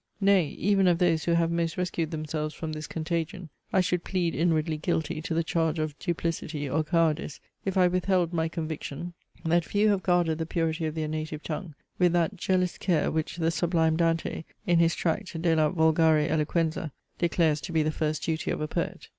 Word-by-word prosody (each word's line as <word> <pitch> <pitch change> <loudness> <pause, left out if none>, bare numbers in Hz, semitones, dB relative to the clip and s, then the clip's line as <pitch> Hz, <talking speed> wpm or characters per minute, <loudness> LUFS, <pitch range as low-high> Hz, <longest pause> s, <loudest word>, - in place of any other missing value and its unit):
Nay, 195 -5 +4
even 195 +5 +2
of 175 -2 +4
those 165 -3 +2
who 170 - +2
have 170 0 +2
most 170 -1 -1
rescued 175 -3 -1
themselves 155 -1 -3
from 160 -1 -5
this 155 0 -5
contagion, 165 +2 -3 0.2
I 190 - +4
should 180 -1 0
plead 175 -4 -1
inwardly 160 -1 +1
guilty 160 -1 -1
to 165 0 -3
the 165 - +2
charge 165 -1 0
of 155 -2 -2
duplicity 165 -4 -2
or 150 +4 +1
cowardice, 160 -2 0 0.3
if 195 -1 -1
I 180 -1 +6
withheld 180 -1 +1
my 160 -1 0
conviction, 160 0 -5 0.3
that 170 +1 +3
few 205 +5 +2
have 200 -2 +2
guarded 175 -3 +2
the 160 - -2
purity 165 -1 -1
of 155 - -5
their 155 -1 -2
native 155 0 -4
tongue 160 -1 -5 0.2
with 180 -2 +4
that 175 +3 +1
jealous 185 -1 0
care, 170 -5 +1
which 160 +1 -2
the 165 -1 +1
sublime 165 -2 +2
Dante 165 -1 0 0.2
in 175 -4 +3
his 165 0 +3
tract 170 0 -2
De 165 -1 +2
la 155 -1 +3
volgare 160 -2 +3
Eloquenza, 160 0 0 0.3
declares 165 -3 +2
to 180 - -6
be 160 -2 +2
the 155 - 0
first 155 -1 -2
duty 160 -1 -1
of - - -1
a 155 - -2
poet. - - -3
165 Hz, 195 wpm, -27 LUFS, 155-175 Hz, 0.3 s, I